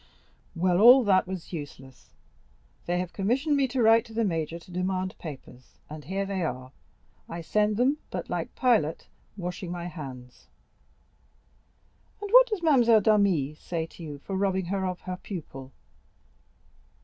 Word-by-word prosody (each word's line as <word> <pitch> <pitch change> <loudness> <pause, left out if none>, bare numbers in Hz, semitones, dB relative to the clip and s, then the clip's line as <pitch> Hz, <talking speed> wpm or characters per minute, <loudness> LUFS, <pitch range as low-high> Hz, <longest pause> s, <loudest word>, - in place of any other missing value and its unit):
Well, 180 +1 +2
all 250 +3 +9
that 190 -3 +3
was 185 -1 -7
useless. 135 -4 -10 0.7
They 175 +1 0
have 180 -1 -3
commissioned 260 +10 0
me 275 -1 +2
to 250 -1 0
write 225 +1 +6
to 225 -2 -13
the 230 - +1
major 165 -4 -2
to 170 +2 -15
demand 185 +1 -2
papers, 130 -5 -11
and 155 -1 -8
here 195 +4 -2
they 195 -1 -3
are. 130 -5 -4 0.6
I 170 - -5
send 210 +4 +1
them, 270 +5 +2
but - - -5
like - - -4
Pilate—washing 180 - -2
my 175 -1 -5
hands." 130 -7 -9 1.7
"And 410 -1 -6
what - - +8
does 425 -7 -4
Mademoiselle 240 -8 +5
d'Armilly 195 -9 +2
say 160 +1 -4
to 165 - -15
you 150 -3 -7
for 190 +7 -6
robbing 190 -1 0
her 190 +1 -2
of 180 -1 -5
her 185 0 -5
pupil?" 140 -9 -8
185 Hz, 150 wpm, -27 LUFS, 160-220 Hz, 1.7 s, all